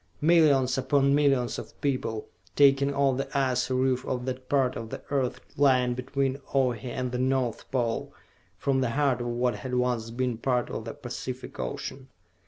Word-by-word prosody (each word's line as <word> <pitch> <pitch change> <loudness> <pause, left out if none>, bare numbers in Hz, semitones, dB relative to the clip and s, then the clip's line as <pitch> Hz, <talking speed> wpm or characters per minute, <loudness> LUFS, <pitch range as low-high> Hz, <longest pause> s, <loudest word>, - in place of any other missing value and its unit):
Millions 145 -5 +4
upon 140 +1 +3
millions 135 -4 +2
of - - -11
people, 130 -6 -2 0.3
taking 140 0 +5
off 140 -2 +2
the 135 - -3
icy 130 -2 +1
roof 130 0 +1
of 125 -2 -3
that 130 0 -5
part 130 -3 +2
of 115 -1 -6
the - - -7
Earth 130 -2 0 0.2
lying 130 -3 +4
between 135 +2 -2
Ohi 125 -3 +1
and 125 0 -3
the 125 - -2
North 130 -3 0
Pole, 120 -4 -1 0.5
from 135 -1 +1
the 130 - +1
heart 135 0 +1
of 120 - -3
what 120 -1 0
had 125 +4 -4
once 125 -2 0
been 120 -1 -2
part 125 0 0
of 110 - -5
the 115 - -6
Pacific 130 -1 -7
Ocean. 130 0 -5
130 Hz, 175 wpm, -27 LUFS, 125-135 Hz, 0.5 s, taking